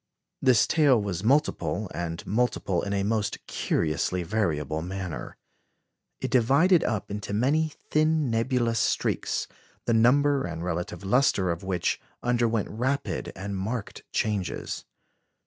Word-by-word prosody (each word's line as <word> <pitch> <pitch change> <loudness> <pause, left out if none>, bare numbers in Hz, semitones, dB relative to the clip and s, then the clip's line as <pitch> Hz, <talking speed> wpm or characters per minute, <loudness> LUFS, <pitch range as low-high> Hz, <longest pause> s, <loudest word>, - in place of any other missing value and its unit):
This 125 -6 +5
tail 145 -6 +4
was 100 -3 -3
multiple, 125 -4 +1
and 85 +1 -4
multiple 105 -5 0
in 100 - -4
a 100 -1 0
most 105 0 0
curiously 85 +3 -1
variable 80 -6 -1
manner. 90 -6 -5 0.8
It - - -3
divided 140 +9 +4
up 110 -2 -2
into 105 0 -4
many 150 +7 +2 0.2
thin 155 -3 +2
nebulous 115 0 +1
streaks, - - 0 0.4
the 120 - +2
number 140 +5 +4
and 85 -1 -4
relative 90 +1 -3
lustre 100 -4 +3
of 85 - -4
which 95 -2 -1 0.2
underwent 120 -3 +1
rapid 130 +6 -2
and 100 +1 -5
marked 100 +4 -4
changes. 105 -5 -2
110 Hz, 125 wpm, -27 LUFS, 90-125 Hz, 0.8 s, This